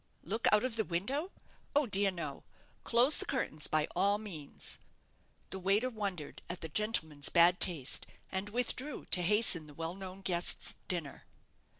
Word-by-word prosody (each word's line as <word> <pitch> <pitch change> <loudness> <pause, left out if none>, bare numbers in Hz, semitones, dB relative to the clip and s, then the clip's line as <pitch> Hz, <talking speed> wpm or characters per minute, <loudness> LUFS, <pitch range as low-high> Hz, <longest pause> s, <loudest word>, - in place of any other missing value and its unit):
"Look 220 +7 -1
out 210 +2 +4
of 250 -3 -2
the 220 - +2
window? 235 - -2 0.5
oh, 290 0 +4
dear 200 -3 +2
no! 165 -7 -6 0.4
Close 245 +5 +4
the - - +2
curtains 155 - -1
by 155 -1 +1
all 200 +3 +3
means." 175 -10 -6 0.7
The 190 - -5
waiter 200 +7 +1
wondered 195 -9 -5
at 180 0 -4
the 160 - -6
gentleman's 160 -7 +1
bad 175 +2 +5
taste, 155 -8 +1 0.2
and 190 +2 -3
withdrew 250 +5 -2
to 180 - +4
hasten 180 -4 +2
the 145 - -14
well 165 +2 -3
known 190 0 -8
guest's 175 -2 +3
dinner. 165 -6 -4
190 Hz, 160 wpm, -33 LUFS, 170-220 Hz, 0.7 s, bad